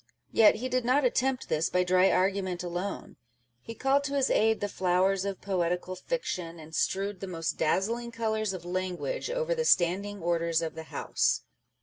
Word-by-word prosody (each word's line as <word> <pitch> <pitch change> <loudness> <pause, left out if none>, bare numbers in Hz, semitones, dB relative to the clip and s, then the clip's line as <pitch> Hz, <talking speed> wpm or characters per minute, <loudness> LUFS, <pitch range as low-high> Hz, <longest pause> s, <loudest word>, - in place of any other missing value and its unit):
Yet 220 -2 +6
he 255 - -3
did 255 -1 0
not 260 +3 +3
attempt 255 +1 +1
this 155 +2 0
by 180 0 +2
dry 185 +1 +4
argument 185 -1 0
alone; 180 +3 -5 0.4
he 230 - -8
called 270 +4 +2
to 280 0 -2
his 275 -2 +2
aid 220 0 +3
the 205 - -1
flowers 190 +1 +1
of 200 -1 -4
poetical 180 -1 -1
fiction, 180 - -4
and 160 0 -12
strewed 195 +3 -1
the 195 - -6
most 165 -3 -3
dazzling 230 +9 0
colours 220 -2 -1
of 180 -3 -7
language 185 - -3
over - - 0
the 485 -1 -1
Standing 200 - +2
Orders 170 -1 +1
of 160 - -3
the 160 - -8
House. - - 0
195 Hz, 180 wpm, -29 LUFS, 180-230 Hz, 0.4 s, Yet